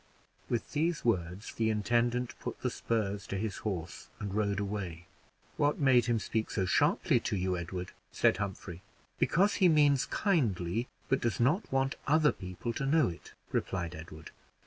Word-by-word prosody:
With 120 - -2
these 160 0 0
words 95 -2 -1
the 110 -1 +1
intendant 120 +3 +1
put - - -6
the - - 0
spurs 105 -3 -2
to 100 - -3
his 105 0 -3
horse, 90 -5 -5
and 100 -2 -4
rode 100 -1 0
away. 95 -5 -4 0.5
"What 145 0 +2
made 130 -4 +4
him 120 -1 +2
speak 110 0 -2
so 95 - 0
sharply 90 - +3
to - - -2
you, 90 0 0
Edward?" 90 +1 -5 0.2
said - - +3
Humphrey. 95 -3 -5 0.4
"Because 200 +4 +3
he 185 - +7
means 145 -4 +4
kindly, 115 - 0 0.2
but 135 - +1
does 120 -2 -1
not 150 - +2
want 135 +1 +1
other 155 0 +5
people 90 +6 -5
to 135 - -2
know 155 - +4
it," 85 - -10 0.2
replied 85 -3 -2
Edward. 80 -1 -10
110 Hz, 165 wpm, -31 LUFS, 95-135 Hz, 0.5 s, he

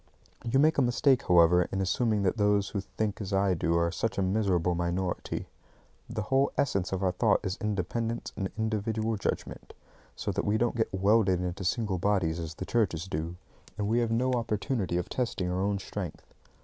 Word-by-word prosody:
You 120 +3 +1
make 150 +2 +4
a - - +5
mistake, 125 +2 +2
however, 90 0 +5
in 95 - -2
assuming 105 +2 +1
that 95 +3 +1
those 105 -1 +2
who 100 - -2
think 105 +1 -3
as 100 -1 -5
I 95 -1 +2
do 85 -1 +1
are 85 0 +1
such 110 +6 -2
a 100 - +2
miserable 95 -3 +1
minority. 85 +1 -2 0.6
The 110 - -3
whole 135 +4 +2
essence 100 -10 0
of 95 0 -2
our 95 - +3
thought 90 - +2
is 95 - -1
independence 105 +3 -2
and 95 -2 -2
individual 110 0 -1
judgment; 100 - -4 0.4
so - - -3
that 100 +1 -1
we 105 +1 +1
don't 120 +1 0
get 110 -1 0
welded 95 -1 +3
into 90 +2 -3
single 95 -1 0
bodies 90 -4 +1
as 80 -1 -5
the 95 - -5
churches 95 -7 0
do, 85 0 -3 0.4
and 105 +2 0
have 120 -1 +2
no 125 +3 +1
opportunity 110 -4 -1
of 90 - -2
testing 105 -8 -2
our 90 +1 -1
own 100 +1 +1
strength. 95 -3 -6
100 Hz, 190 wpm, -29 LUFS, 90-115 Hz, 0.6 s, a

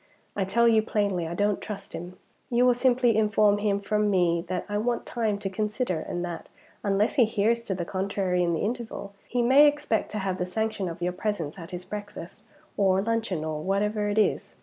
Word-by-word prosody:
I 195 - 0
tell 235 +5 +3
you 225 -1 +5
plainly 200 -6 -1
I 170 - -4
don't 205 +1 +1
trust 200 -2 -7
him. 180 +2 -7 0.3
You 245 +1 +3
will 250 - +6
simply 245 -2 +3
inform 210 -1 +3
him 205 -1 +1
from 210 +1 0
me 175 -3 +2
that 180 0 -3
I 205 0 -1
want 235 +2 -1
time 220 -4 -1
to 200 -1 -4
consider, 210 -1 -1
and 175 +2 -4
that, 170 -1 -7 0.3
unless 205 +7 +1
he 245 - +6
hears 225 +1 +1
to 190 - -2
the 175 -2 -3
contrary 190 -1 -1
in 170 -1 +1
the - - -2
interval, 220 -3 -4
he 245 -1 0
may 275 +5 +7
expect 290 -6 0
to - - -2
have 190 -2 -2
the 180 - 0
sanction 220 -1 -2
of 170 +1 -6
your 180 0 0
presence 180 -4 -3
at 165 - -9
his 180 0 -7
breakfast, 205 -4 -8 0.4
or 195 -1 +3
luncheon, 225 -7 -1
or 155 -1 -3
whatever 205 +3 0
it 205 - -2
is. 215 - +1
205 Hz, 210 wpm, -26 LUFS, 185-220 Hz, 0.4 s, may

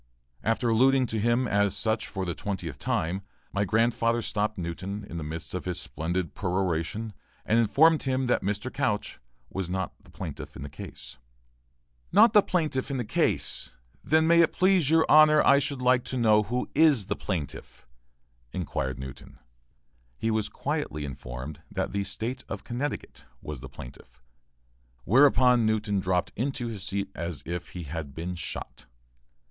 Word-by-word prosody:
After 115 +2 +1
alluding 130 +3 +4
to 110 -2 -2
him 120 +3 +2
as 100 -2 +2
such 110 0 0
for 95 -2 -4
the 85 - -2
twentieth 90 -7 -5
time, 90 +4 -1 0.3
my 100 - +1
grandfather 115 +2 +2
stopped 105 +1 -1
Newton 95 +4 -4
in 85 - -6
the 80 - -4
midst 80 +2 -6
of 90 - -4
his 90 -1 -2
splendid 85 +1 -3
peroration 95 +3 -1 0.3
and 115 - +3
informed 155 +8 +5
him 130 -1 0
that 125 - +2
Mr. 105 +6 -3
Couch 110 -7 -1 0.3
was 95 -2 -3
not 95 -1 -2
the - - -20
plaintiff - - -7
in 65 - -7
the 70 - -6
case. 70 - -9 0.9
"Not 230 - +6
the 210 - +8
plaintiff! 155 -9 -1 1.2
Then 160 +1 +3
may 170 +1 +6
it 165 - +3
please 185 -5 +3
your 160 0 +5
honor 155 0 +7
I 140 - +6
should 140 -2 -3
like 125 -1 +4
to 130 - -3
know 110 -3 +5
who 125 +4 -2
is 145 -8 +5
the - - -2
plaintiff?" 80 -9 -5 0.7
inquired 65 -6 -3
Newton. 65 0 -9 0.8
He 115 - 0
was 110 -1 0
quietly 75 0 -3
informed 65 +3 -7
that 95 -2 -2
the 100 0 -1
State 115 +6 -4
of - - -5
Connecticut 130 +4 -4
was 75 -3 -7
the 65 +1 -9
plaintiff, 60 -1 -12 0.8
whereupon 125 - +5
Newton 105 -2 +1
dropped 90 -1 0
into 125 0 -2
his 105 -4 -6
seat 100 0 -2
as 85 -2 -5
if 90 +1 -4
he 90 - -5
had 75 -2 -6
been 85 +3 -4
shot. 85 -7 -6
105 Hz, 160 wpm, -27 LUFS, 85-125 Hz, 1.2 s, the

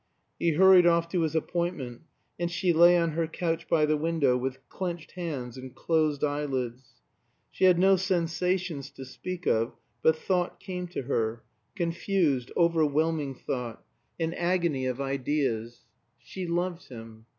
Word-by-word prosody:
He 170 -1 +2
hurried 185 +1 +7
off 170 0 +3
to 180 -1 0
his 160 -1 -1
appointment, 160 -7 -2 0.4
and 175 0 0
she 175 +1 +1
lay 175 +2 +7
on 170 -1 +1
her 165 +1 -1
couch 165 0 -3
by 155 -2 +4
the 155 0 +2
window 155 -4 +2
with 130 +1 -4
clenched 175 -3 -5
hands 140 -9 -5
and 130 0 -10
closed 155 -3 +1
eyelids. 135 -4 -2 0.6
She - - +1
had 180 -2 +6
no 190 +2 +5
sensations 180 -3 -1
to 135 - -10
speak 180 +7 -7
of; 115 +1 +1 0.3
but 160 - +4
thought 180 +2 -1
came 180 -2 -5
to 175 -5 -5
her 115 -3 -1 0.3
confused, 165 -6 0
overwhelming 160 -3 +2
thought 125 -3 -5 0.3
an 165 0 -1
agony 170 -7 0
of 125 0 -3
ideas. 135 -4 -2 0.3
She 180 +9 -7
loved 175 +1 -2
him. 115 -2 -11
160 Hz, 150 wpm, -28 LUFS, 135-175 Hz, 0.6 s, hurried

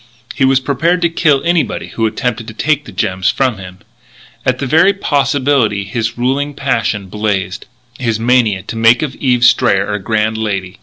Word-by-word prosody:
He 135 - +1
was 135 0 +3
prepared 160 +7 0
to 170 - +3
kill 150 -5 +2
anybody 170 -1 0
who 115 -1 -1
attempted 115 0 -3
to 110 - -9
take 150 +3 0
the - - -10
gems 95 0 -1
from 130 -7 0
him. 95 -1 -10 0.7
At 130 -1 +2
the 135 - -3
very 160 +9 +4
possibility 140 - +1
his 115 +3 -3
ruling 135 +4 -1
passion 115 -7 -1
blazed 95 -1 -3 0.3
his 115 -4 -1
mania 115 -5 +2
to - - -7
make 115 +3 +4
of 140 -4 -3
Eve 125 -3 +1
Strayer 105 -4 +3
a 105 - -2
grand 110 +2 -1
lady. 100 -4 -3
120 Hz, 175 wpm, -15 LUFS, 105-140 Hz, 0.7 s, very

